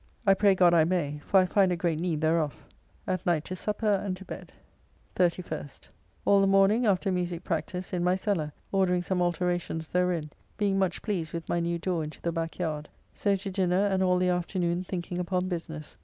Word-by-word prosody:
I 195 Hz, -, +7 dB
pray 200 Hz, 0 st, +4 dB
God 180 Hz, -2 st, +5 dB
I 165 Hz, -2 st, +6 dB
may, 155 Hz, -4 st, -1 dB
for 195 Hz, -, +4 dB
I 185 Hz, -, +4 dB
find 190 Hz, 0 st, +3 dB
a -, -, +1 dB
great 165 Hz, -2 st, -1 dB
need 165 Hz, -3 st, -1 dB
thereof. 155 Hz, -4 st, 0 dB, 0.4 s
At 185 Hz, -1 st, -2 dB
night 165 Hz, -3 st, +1 dB
to 185 Hz, -, -5 dB
supper 210 Hz, +4 st, -3 dB, 0.2 s
and 185 Hz, -2 st, -3 dB
to 190 Hz, -, -11 dB
bed. -, -, -8 dB, 0.6 s
31st. 175 Hz, -5 st, -2 dB, 0.4 s
All 200 Hz, -1 st, +5 dB
the 195 Hz, -, +4 dB
morning, 195 Hz, +4 st, +4 dB
after 195 Hz, 0 st, +2 dB
musique 175 Hz, -2 st, -2 dB
practice, 180 Hz, +3 st, -3 dB
in 175 Hz, -1 st, 0 dB
my 180 Hz, +1 st, +3 dB
cellar, 185 Hz, -6 st, -1 dB, 0.2 s
ordering 180 Hz, -2 st, +2 dB
some 180 Hz, 0 st, -1 dB
alteracons 175 Hz, -2 st, -1 dB
therein, 180 Hz, -4 st, 0 dB, 0.3 s
being 200 Hz, -2 st, +1 dB
much 185 Hz, -2 st, -1 dB
pleased 175 Hz, -7 st, -2 dB
with 170 Hz, -1 st, -5 dB
my 175 Hz, -, 0 dB
new 170 Hz, 0 st, -1 dB
door 170 Hz, -1 st, -1 dB
into 155 Hz, 0 st, -8 dB
the 170 Hz, -, -2 dB
back 165 Hz, -1 st, -3 dB
yard. 155 Hz, -4 st, -3 dB, 0.2 s
So 200 Hz, -1 st, +1 dB
to 195 Hz, 0 st, -5 dB
dinner, 185 Hz, +1 st, +2 dB
and 190 Hz, -2 st, +1 dB
all 180 Hz, -1 st, +3 dB
the 180 Hz, 0 st, +2 dB
afternoon 175 Hz, 0 st, 0 dB
thinking 175 Hz, -1 st, -4 dB
upon 180 Hz, +1 st, -1 dB
business. 165 Hz, -, -6 dB
180 Hz, 200 wpm, -28 LUFS, 170-190 Hz, 0.6 s, I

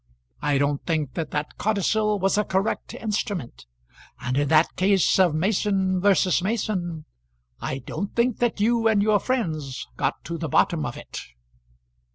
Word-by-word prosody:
I 145 Hz, -1 st, +1 dB
don't 140 Hz, 0 st, 0 dB
think 155 Hz, -6 st, -1 dB
that 160 Hz, 0 st, -3 dB
that 150 Hz, 0 st, -4 dB
codicil 210 Hz, 0 st, +1 dB
was 195 Hz, +1 st, +1 dB
a 210 Hz, -, +2 dB
correct 195 Hz, +2 st, -2 dB
instrument; 200 Hz, -, -4 dB, 0.5 s
and 130 Hz, 0 st, -2 dB
in 145 Hz, +1 st, +2 dB
that 155 Hz, +2 st, +3 dB
case 190 Hz, 0 st, +3 dB
of 175 Hz, -5 st, +4 dB
Mason 190 Hz, +1 st, +1 dB
versus 195 Hz, -2 st, +3 dB
Mason 185 Hz, -6 st, -2 dB, 0.5 s
I 130 Hz, -, -3 dB
don't 195 Hz, +10 st, -5 dB
think 235 Hz, 0 st, +1 dB
that 240 Hz, -3 st, 0 dB
you 225 Hz, +2 st, +3 dB
and 210 Hz, -2 st, +3 dB
your 210 Hz, -1 st, +3 dB
friends 155 Hz, -, -2 dB
got -, -, -1 dB
to 170 Hz, 0 st, -5 dB
the 160 Hz, -1 st, -3 dB
bottom 160 Hz, -5 st, +2 dB
of 120 Hz, -, -6 dB
it." -, -, -7 dB
185 Hz, 160 wpm, -24 LUFS, 155-210 Hz, 0.5 s, of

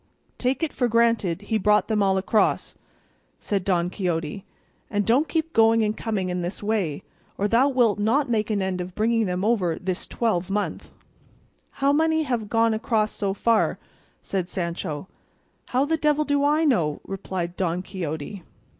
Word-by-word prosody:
"Take 255 Hz, +4 st, 0 dB
it 320 Hz, -, -1 dB
for 245 Hz, -, +1 dB
granted 230 Hz, -6 st, +2 dB
he 220 Hz, +1 st, 0 dB
brought 210 Hz, +1 st, +3 dB
them 215 Hz, -2 st, +1 dB
all 190 Hz, -1 st, +3 dB
across," 205 Hz, +3 st, +1 dB, 0.7 s
said 200 Hz, -3 st, -2 dB
Don 180 Hz, -2 st, +1 dB
Quixote, 175 Hz, -1 st, -2 dB, 0.5 s
"and 205 Hz, -1 st, 0 dB
don't 265 Hz, +7 st, +3 dB
keep 325 Hz, 0 st, -1 dB
going 225 Hz, 0 st, +5 dB
and 215 Hz, 0 st, 0 dB
coming 205 Hz, -6 st, -2 dB
in 180 Hz, 0 st, -2 dB
this 175 Hz, +4 st, -5 dB
way, 200 Hz, -9 st, -1 dB, 0.3 s
or 205 Hz, -, +1 dB
thou 240 Hz, +6 st, +4 dB
wilt 240 Hz, -6 st, +2 dB
not 240 Hz, +8 st, +2 dB
make 220 Hz, -3 st, 0 dB
an 205 Hz, -3 st, 0 dB
end 185 Hz, -1 st, -2 dB
of 180 Hz, 0 st, -7 dB
bringing 225 Hz, 0 st, +1 dB
them 180 Hz, +2 st, -1 dB
over 190 Hz, -8 st, +1 dB
this 185 Hz, 0 st, -4 dB
twelvemonth." 205 Hz, -2 st, -1 dB, 1.0 s
"How 280 Hz, -, +5 dB
many 320 Hz, +1 st, +2 dB
have 240 Hz, -7 st, -2 dB
gone 225 Hz, 0 st, +3 dB
across 220 Hz, -1 st, 0 dB
so 195 Hz, -1 st, -2 dB
far?" 230 Hz, +1 st, +2 dB, 0.5 s
said 185 Hz, -2 st, -2 dB
Sancho. 170 Hz, -3 st, -4 dB, 0.6 s
"How 255 Hz, +3 st, +1 dB
the 320 Hz, +2 st, 0 dB
devil 300 Hz, 0 st, +2 dB
do 285 Hz, -1 st, +1 dB
I 300 Hz, +3 st, +3 dB
know?" 170 Hz, -, +1 dB
replied 180 Hz, -2 st, -4 dB
Don 180 Hz, -1 st, -1 dB
Quixote. 175 Hz, 0 st, -5 dB
210 Hz, 165 wpm, -24 LUFS, 185-235 Hz, 1.0 s, going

